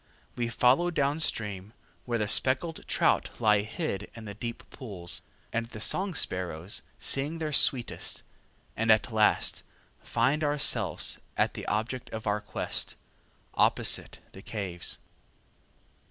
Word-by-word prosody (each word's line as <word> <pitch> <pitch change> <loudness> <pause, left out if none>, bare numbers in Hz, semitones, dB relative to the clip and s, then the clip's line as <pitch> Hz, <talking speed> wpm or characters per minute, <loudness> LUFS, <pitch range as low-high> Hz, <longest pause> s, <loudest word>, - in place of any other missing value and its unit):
We 120 -1 -1
follow 130 +9 +4
downstream, 115 - -1 0.3
where 120 -1 0
the 105 -2 0
speckled 135 +9 +2
trout - - +2
lie 105 -3 +5
hid 105 -2 -4
in 115 -1 -9
the 100 - -6
deep 115 +3 -6
pools, 95 -9 -6 0.3
and 115 0 -1
the 110 - -9
song 185 - 0
sparrows 90 - -1 0.2
sing 145 +4 0
their 155 -2 -3
sweetest, 125 -3 +3 0.5
and 115 0 +3
at 110 +2 +3
last 110 -1 +3 0.4
find 135 +6 +1
ourselves 145 -1 +1 0.2
at - - +2
the - - -7
object 115 +5 -2
of 110 -1 -6
our 105 0 +1
quest, - - -2 0.6
opposite - - +2
the 95 - -11
caves. 95 -6 -3
115 Hz, 125 wpm, -29 LUFS, 105-135 Hz, 0.6 s, lie